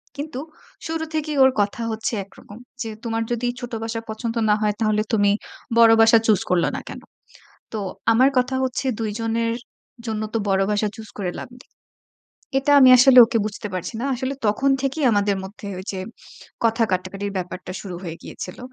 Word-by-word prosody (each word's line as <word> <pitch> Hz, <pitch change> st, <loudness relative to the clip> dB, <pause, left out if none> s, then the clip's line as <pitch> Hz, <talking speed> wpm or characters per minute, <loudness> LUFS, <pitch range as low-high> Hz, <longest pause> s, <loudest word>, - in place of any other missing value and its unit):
কিন্তু 285 Hz, -2 st, -5 dB, 0.5 s
শুরু 320 Hz, 0 st, -2 dB
থেকেই 305 Hz, -2 st, -2 dB
ওর 265 Hz, -, +6 dB
কথা 205 Hz, +3 st, -2 dB
হচ্ছে 220 Hz, +2 st, -3 dB
একরকম। 205 Hz, +2 st, -15 dB, 0.2 s
যে, 225 Hz, -, -3 dB
"তোমার 225 Hz, -1 st, -1 dB
যদি 240 Hz, +1 st, -1 dB
ছোট 245 Hz, -1 st, -7 dB
বাসা 225 Hz, 0 st, -3 dB
পছন্দ 230 Hz, +1 st, -4 dB
না 210 Hz, -, +5 dB
হয় 210 Hz, -1 st, +1 dB
তাহলে 215 Hz, -1 st, +2 dB
তুমি 205 Hz, -2 st, +4 dB, 0.5 s
বড় 230 Hz, -1 st, +8 dB
বাসা 225 Hz, 0 st, +7 dB
চুজ 210 Hz, -4 st, +4 dB
করলা 180 Hz, -2 st, +2 dB
না -, -, -4 dB
কেন?" -, -, -8 dB, 0.7 s
তো 215 Hz, -, -2 dB, 0.3 s
আমার 255 Hz, +4 st, +5 dB
কথা 255 Hz, +1 st, +1 dB
হচ্ছে 260 Hz, +1 st, -2 dB
২ 220 Hz, -2 st, -2 dB
জনের 230 Hz, 0 st, 0 dB, 0.5 s
জন্য 220 Hz, -1 st, -3 dB
তো -, -, +1 dB
বড় 195 Hz, 0 st, +2 dB
বাসা 210 Hz, +1 st, +1 dB
চুজ 220 Hz, -1 st, -10 dB
করে 180 Hz, -2 st, -2 dB
লাভ -, -, -9 dB
নেই। -, -, -19 dB, 0.9 s
এটা 290 Hz, +2 st, +1 dB
আমি 260 Hz, -1 st, +8 dB
আসলে 255 Hz, +1 st, +6 dB
ওকে 230 Hz, -, -1 dB
বুঝতে 210 Hz, 0 st, -5 dB
পারছি 185 Hz, +5 st, -4 dB
না। 265 Hz, -, -2 dB
আসলে 260 Hz, +2 st, -3 dB
তখন 265 Hz, +7 st, +2 dB
থেকেই 275 Hz, +2 st, -2 dB
আমাদের 205 Hz, -1 st, +2 dB
মধ্যে 200 Hz, +1 st, -9 dB
ঐ -, -, -5 dB
যে 190 Hz, -, -5 dB, 0.6 s
কথা 230 Hz, 0 st, +2 dB
কাটাকাটির 195 Hz, +2 st, -2 dB
ব্যাপারটা 185 Hz, 0 st, -6 dB
শুরু 185 Hz, -3 st, -7 dB
হয়ে 165 Hz, -2 st, -5 dB
গিয়েছিল। 180 Hz, -, -8 dB
225 Hz, 185 wpm, -22 LUFS, 205-250 Hz, 0.9 s, বড়